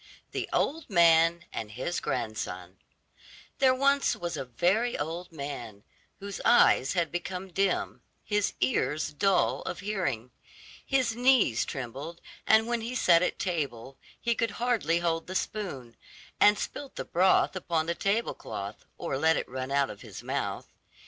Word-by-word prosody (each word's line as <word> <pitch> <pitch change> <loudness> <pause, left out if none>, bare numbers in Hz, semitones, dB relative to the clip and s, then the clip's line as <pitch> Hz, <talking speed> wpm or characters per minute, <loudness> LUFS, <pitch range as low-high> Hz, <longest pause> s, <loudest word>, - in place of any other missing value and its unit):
THE - - -3
OLD 315 -1 0
MAN 170 -1 +5
AND 110 -1 -5
HIS 130 +9 -2
GRANDSON 95 -6 -4 0.8
There 260 -1 +5
was 275 +1 +2
once 175 -1 -4
a - - -4
very 190 - +1
old 170 +4 -4
man, 140 -9 -7 0.4
whose 200 0 -6
eyes 140 - +5
had 170 -3 0
become 180 +1 -5
dim, 195 0 0 0.2
his 210 -1 0
ears 135 +4 0
dull 195 +5 +2
of - - -5
hearing, 170 - -2 0.5
his 255 -4 +1
knees 245 - +4
trembled, 135 +6 -6 0.3
and 220 0 +6
when 235 0 -1
he 235 +3 -4
sat 170 -8 +5
at 180 - 0
table 135 - -3 0.2
he 235 - +1
could 230 0 0
hardly 230 -9 +1
hold 165 -1 -1
the 185 - -6
spoon, 140 - -4 0.4
and 210 0 +6
spilt 280 +5 -6
the - - -4
broth 185 +2 +3
upon 170 -3 -1
the 170 - 0
table 205 +6 0
cloth 100 0 -7
or 135 - -3
let 160 +1 +4
it - - -3
run 130 +1 -5
out 140 0 +1
of 105 - -12
his - - -10
mouth. - - -3
170 Hz, 155 wpm, -28 LUFS, 135-210 Hz, 0.8 s, and